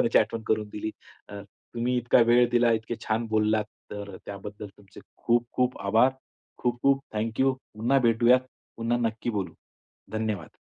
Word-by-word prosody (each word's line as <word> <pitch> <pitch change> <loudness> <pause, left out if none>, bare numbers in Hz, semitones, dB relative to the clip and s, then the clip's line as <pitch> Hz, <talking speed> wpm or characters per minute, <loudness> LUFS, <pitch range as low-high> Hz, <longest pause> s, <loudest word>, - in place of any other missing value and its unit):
लहानपणाची 115 - +4
आठवण 115 -1 0
करून 110 -1 0
दिली. 110 +1 -3 0.4
अ, 100 0 -7 0.3
तुम्ही 120 +2 0
इतका 120 +1 +3
वेळ 120 +1 +5
दिला, 120 -1 +4
इतके 115 +1 -2
छान 115 +1 0
बोललात, 110 0 +2 0.3
तर 100 -1 -6
अ, - - -7
त्याबद्दल 100 +1 -7
तुमचे 100 -2 -15 0.2
खूप 120 0 +1
खूप 125 0 0
आभार. 110 +6 +4 0.5
खूप 120 -1 -1
खूप 135 0 +4
थँक 110 +2 -2
यू. 135 0 +4 0.2
पुन्हा 120 +6 +2
भेटूयात. 120 +2 +5 0.4
पुन्हा 115 +1 0
नक्की 115 +2 -4
बोलू. 95 -6 -3 0.6
धन्यवाद. 110 -6 -3
115 Hz, 165 wpm, -27 LUFS, 105-120 Hz, 0.6 s, वेळ